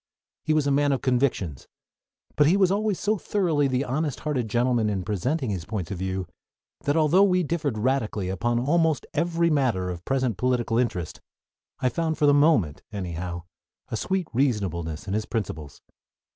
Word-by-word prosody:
He - - 0
was 150 -2 +2
a 140 - +2
man 145 +1 +3
of 135 - -2
convictions; 120 - 0 0.7
but 145 0 +4
he 180 +5 +4
was 190 -2 +4
always 205 -1 0
so 210 -1 0
thoroughly 165 -9 +1
the 130 +1 0
honest 145 +2 -2
hearted 130 -7 -2
gentleman 120 -1 +2
in 95 -3 -2
presenting 110 - -1
his 90 -4 -3
points 100 -1 -4
of 95 - -4
view 95 0 -2 0.6
that, 145 +2 +2
although 160 +4 +4
we 185 -2 +4
differed 150 -6 -2
radically 110 -5 0
upon 120 +6 0
almost 160 +2 +1
every 170 +1 +1
matter 115 -11 +1
of 85 -1 -7
present 130 -4 0
political 120 -1 +1
interest, 90 -10 -2 0.6
I 130 - +3
found 160 +4 -1
for 150 - +2
the 145 - +6
moment, 145 - +3
anyhow, 90 -3 -5 0.5
a - - -3
sweet 185 - -1
reasonableness 95 - -1
in 95 - -2
his 110 +1 -1
principles. 80 - -5
125 Hz, 170 wpm, -25 LUFS, 100-155 Hz, 0.7 s, the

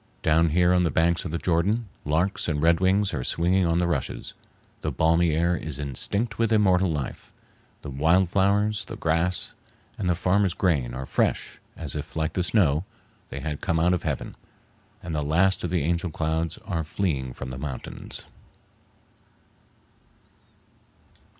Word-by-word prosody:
Down 80 +1 +4
here 90 +3 +3
on 90 - +4
the 85 - +2
banks 85 +2 +1
of 85 - -4
the 85 - -1
Jordan, 95 +8 +1 0.2
larks 85 +7 0
and 75 -3 0
redwings 95 +5 +3
are 65 -5 -2
swinging 90 +4 +2
on 85 0 +2
the 90 - +2
rushes; 85 -6 -3 0.5
the - - -2
balmy 80 0 +3
air 85 +2 +2
is 80 -4 -4
instinct 100 - -1
with 115 -1 +2
immortal 95 -4 +3
life; 75 -5 -5 0.5
the 70 - -6
wild 80 +7 +3
flowers, 105 +3 +2
the 115 - -7
grass, 85 0 0 0.5
and 95 -4 0
the 90 - +3
farmers' 95 +1 +1
grain 70 -10 0
are 65 +1 -4
fresh - - -1 0.2
as 80 -4 -4
if, 75 0 -6
like 80 -1 -1
the 90 - 0
snow, 85 -5 +2 0.5
they 70 - -6
had 75 0 -4
come 80 - 0
out 90 +2 +3
of 90 - 0
heaven, - - -3 0.7
and 85 - -5
the 75 - 0
last 90 +6 +2
of 90 - -1
the 85 -3 0
angel 85 +3 0
clouds 80 +1 -2
are 85 -5 -2
fleeing 75 -6 -2
from 65 - -7
the 65 0 -6
mountains. 70 -3 -7
85 Hz, 165 wpm, -25 LUFS, 75-95 Hz, 0.7 s, Down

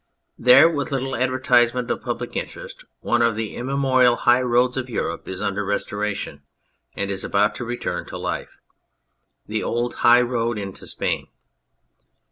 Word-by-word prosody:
There, 125 +6 +7
with 150 -4 -2
little 135 0 -2
advertisement 125 -1 +2
of - - -2
public - - -5
interest, - - -6 0.2
one 120 0 +1
of 115 -1 +2
the 110 -1 -4
immemorial 130 -1 +2
high 120 +1 +3
roads 125 0 +2
of 130 -1 -4
Europe 115 - -3
is 95 +2 -5
under 100 0 -1
restoration 100 -6 -3 0.5
and 100 0 -3
is 95 -1 -1
about 105 +2 +2
to - - -3
return 115 -7 -4
to - - -7
life: - - -5 0.9
the 110 0 -3
old 120 +1 -1
High 120 +1 +7
Road 120 -2 -1
into 100 -2 -7
Spain. - - -2
120 Hz, 150 wpm, -22 LUFS, 105-125 Hz, 0.9 s, There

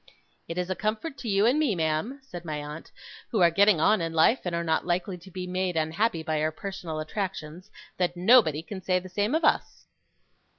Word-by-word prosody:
'It 165 - -6
is 180 +1 -2
a - - 0
comfort 220 - -3
to 240 - -6
you 200 +1 +3
and 255 +6 +3
me, 280 -10 +2
ma'am,' 160 - -1
said 175 -9 -9
my 155 -3 -4
aunt, 150 +2 -8 0.4
'who 220 - 0
are 170 -2 +5
getting 200 0 +4
on 210 +4 +3
in 165 0 -3
life, 165 +10 +4
and 175 -1 -1
are 170 - -1
not 160 -1 +1
likely 180 +2 -1
to 180 +1 -13
be 185 0 -6
made 180 -1 -2
unhappy 165 +3 0
by 155 -1 -1
our 155 +1 +1
personal 180 -3 -6
attractions, 180 +1 -5 0.3
that 175 -1 0
nobody 180 - +5
can 190 +1 -7
say 185 0 +1
the 185 +1 -5
same 205 - 0
of 325 - 0
us. - - 0
180 Hz, 215 wpm, -27 LUFS, 160-205 Hz, 0.4 s, are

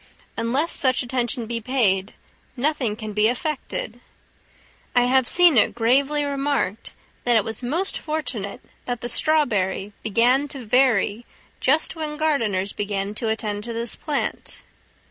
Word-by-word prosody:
Unless 255 +8 0
such 260 -2 +4
attention 240 -1 -1
be 230 +1 -4
paid 210 -6 +1 0.4
nothing 260 -5 0
can 215 -1 -6
be 210 +1 +3
effected. 245 -2 -3 1.0
I 245 - +5
have 260 0 +3
seen 345 -8 +6
it - - +1
gravely 275 +6 +2
remarked, 280 -7 -2 0.3
that 240 -1 +2
it 220 - +4
was 225 +2 -4
most 325 +11 -1
fortunate 250 -10 -4 0.2
that 245 -2 -4
the 240 - -4
strawberry 210 -10 +1
began 245 +6 +3
to 270 -4 -8
vary 235 -2 +2 0.3
just 305 +7 +2
when 305 -2 -4
gardeners 225 -11 0
began 200 0 -3
to 225 +1 -1
attend 210 -2 -2
to 235 - -5
this 230 0 -1
plant. 295 -2 -3
245 Hz, 140 wpm, -23 LUFS, 215-280 Hz, 1.0 s, seen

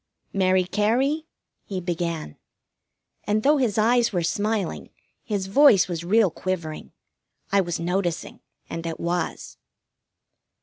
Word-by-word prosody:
"Mary 185 -1 +3
Cary," 245 - 0 0.4
he 190 -2 -4
began. 170 - -3 0.9
And 215 +1 0
though 295 +2 +4
his 240 -7 0
eyes 235 +2 +3
were 175 -4 -1
smiling, 200 - -1 0.3
his 200 -3 -2
voice 205 -1 +5
was 170 -2 -4
real 200 +1 +3
quivering. 170 -4 -4 0.6
I 200 0 +4
was 175 -3 -3
noticing, 175 0 -2 0.3
and 165 0 -5
it 165 - -5
was. 175 0 -3
190 Hz, 120 wpm, -24 LUFS, 170-215 Hz, 0.9 s, voice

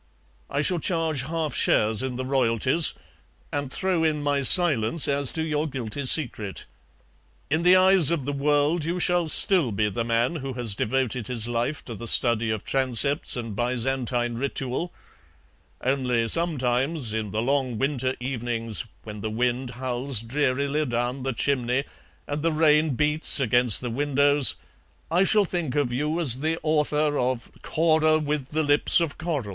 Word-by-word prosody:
I 140 +2 -1
shall 175 +2 +1
charge 160 -4 -1
half 155 0 -3
shares 110 0 +2
in 130 -1 -4
the 130 +1 -4
royalties, 130 +4 +2 0.6
and 145 -2 -3
throw 185 -1 0
in 155 -2 0
my 145 -1 0
silence 150 - +4
as 140 -2 +2
to 160 - -2
your 155 0 -1
guilty 130 -1 -5
secret. 110 -9 0 0.9
In 155 +2 +1
the 180 +2 +5
eyes 185 -4 +5
of 165 -6 -1
the 145 - -3
world 145 +3 +1
you 170 +3 -2
shall 175 -1 +1
still 160 - +2
be 105 +1 0
the 115 +5 -2
man 120 +7 0
who 135 -2 -6
has 120 -4 0
devoted 125 +1 -2
his 120 -3 0
life 120 +5 -3
to 120 - -7
the 115 +2 -8
study 115 -1 +2
of 110 -2 -3
transepts 135 +2 0
and 115 -4 -6
Byzantine 120 0 -1
ritual; 135 +4 -3 0.9
only 125 -3 0
sometimes, 135 -4 +1
in 110 -2 -3
the 110 +3 -2
long 130 -3 -1
winter 130 0 -1
evenings, 120 -3 -4 0.2
when 105 -1 -9
the 110 - -3
wind 125 +3 -2
howls 125 0 -2
drearily 140 +4 -1
down 120 0 -3
the 135 +1 -2
chimney 125 +1 -1 0.4
and 145 +1 -4
the 165 +1 +1
rain 155 -2 +2
beats 150 +2 +2
against 120 -3 +3
the 120 -2 -4
windows, 145 +1 +2 0.6
I 180 +3 +3
shall 210 0 +3
think 170 -7 -4
of 145 -4 0
you 150 +6 -1
as 130 -7 +4
the 160 +3 -1
author 150 -1 0
of 125 -1 -2
'Cora 155 -1 +2
with 150 -3 -3
the 155 +1 0
lips 145 +3 +4
of 165 -4 -3
coral.' 160 -7 -3
135 Hz, 160 wpm, -24 LUFS, 120-155 Hz, 0.9 s, the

